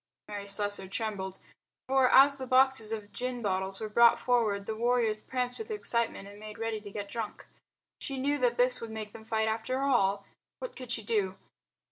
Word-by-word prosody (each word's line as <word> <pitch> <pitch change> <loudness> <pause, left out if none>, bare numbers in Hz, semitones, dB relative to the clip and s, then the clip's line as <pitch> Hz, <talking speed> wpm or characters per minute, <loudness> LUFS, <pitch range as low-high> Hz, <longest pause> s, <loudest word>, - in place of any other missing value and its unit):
Mary 205 -1 -6
Slessor 205 -1 -1
trembled. 195 -2 -3 0.5
For 265 -1 +4
as 280 +1 +7
the 260 - -5
boxes 260 -3 +3
of 210 -2 -5
gin 250 0 -4
bottles 190 -1 0
were 220 - -3
brought 235 +2 +6
forward 220 -5 +1
the 220 - -3
warriors 230 -2 +1
pranced 250 0 -2
with 445 0 -6
excitement 235 - -1
and 205 +1 -12
made 215 0 -9
ready 225 -1 -2
to 205 - -9
get 200 0 -5
drunk. 220 0 -5 0.5
She 275 - -4
knew 285 +2 0
that 245 -1 +2
this 250 0 +3
would 230 - -5
make 215 -1 -6
them 220 - -11
fight 220 0 0
after 225 +4 -1
all. 200 -7 +2 0.3
What - - -7
could 255 -2 -7
she 225 -2 0
do? 200 -3 0
225 Hz, 190 wpm, -30 LUFS, 205-250 Hz, 0.5 s, as